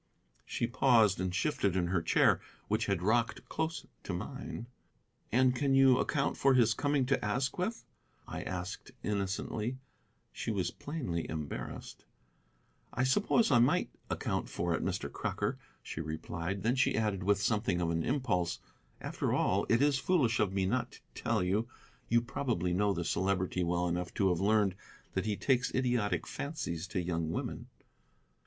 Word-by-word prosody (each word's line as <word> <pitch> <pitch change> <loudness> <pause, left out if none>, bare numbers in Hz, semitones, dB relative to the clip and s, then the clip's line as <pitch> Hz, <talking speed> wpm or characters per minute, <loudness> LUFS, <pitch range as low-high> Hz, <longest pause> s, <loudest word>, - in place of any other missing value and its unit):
She - - -1
paused 115 -5 +4
and 95 0 -1
shifted 100 - 0
her 90 -1 +1
chair, - - +4 0.3
which 110 +2 0
had 100 -4 0
rocked 115 +3 +1
close 160 +1 -2 0.2
to 90 - -5
mine. 115 +5 -5 0.7
"And 125 +1 +4
can 135 +1 +2
you 135 -1 +6
account 140 -2 0
for 135 -1 +4
his 115 -3 +5
coming 145 0 +1
to 135 +2 +1
Asquith?" 135 - -1 0.4
I - - -5
asked 90 0 -5
innocently. 105 +4 -2 0.5
She - - -5
was 95 -6 0
plainly 125 - -4
embarrassed. 75 -2 -6 0.9
"I 125 - 0
suppose 205 - +3
I 120 - +6
might 120 - +3 0.2
account - - -2
for 85 -1 -1
it, - - -1
Mr. - - -2
Crocker," - - -2 0.2
she 80 - -5
replied. 85 +4 -4
Then 115 +3 +3
she 130 - +2
added, 105 -3 0
with 100 +1 +2
something 100 -2 +1
of 85 -1 0
an 85 0 0
impulse, 100 - 0 0.4
"After - - -2
all, - - +1
it 120 +4 +4
is 145 -2 +3
foolish 135 -12 +2
of 105 -3 +2
me 95 -1 0
not 120 +6 -1
to - - -13
tell - - 0
you. 100 +6 +1 0.4
You 120 +1 +4
probably 120 -8 -1
know 100 +3 +2
the 85 -3 -2
Celebrity 95 0 0
well 85 +1 +1
enough 90 +1 -2
to 95 -2 +3
have 90 -2 +1
learned 100 -1 +3 0.4
that 95 +3 -1
he 105 -2 0
takes 125 -2 +1
idiotic 120 -5 +1
fancies 95 - -4
to 90 - -2
young 85 -2 -1
women." 85 - -4
105 Hz, 160 wpm, -32 LUFS, 90-130 Hz, 0.9 s, you